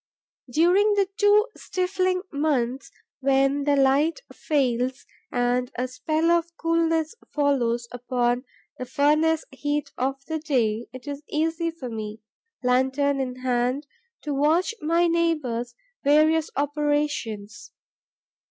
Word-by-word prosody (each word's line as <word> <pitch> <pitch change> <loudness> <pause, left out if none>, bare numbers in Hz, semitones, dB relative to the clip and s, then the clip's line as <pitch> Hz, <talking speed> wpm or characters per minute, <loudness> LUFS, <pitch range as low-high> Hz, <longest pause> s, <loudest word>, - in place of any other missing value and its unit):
During 370 - +4
the 395 -2 +2
two 420 0 +4
stifling 370 0 -1
months, 275 -3 -1 0.3
when 275 +1 +2
the 290 -1 +3
light 280 - +3
fails 255 -3 0 0.3
and 245 +1 0
a 250 +1 -1
spell 310 +6 0
of 340 0 0
coolness 330 -1 +1 0.2
follows 245 -5 +1
upon 245 0 0 0.4
the 255 - -3
furnace 305 +4 +2
heat 290 +2 -2
of 270 +2 0
the 320 0 -3
day, 240 -7 0
it 255 +1 -10
is 285 0 -5
easy 325 +2 0
for 325 -6 -7
me, 215 -1 -6 0.4
lantern 265 +3 +2
in 255 -1 -4
hand, 250 +3 0 0.4
to 295 - -2
watch 310 +9 +2
my 335 +3 +2
neighbour's 300 -9 0 0.3
various 310 +2 +4
operations. 290 -7 -2
285 Hz, 115 wpm, -25 LUFS, 250-320 Hz, 0.4 s, During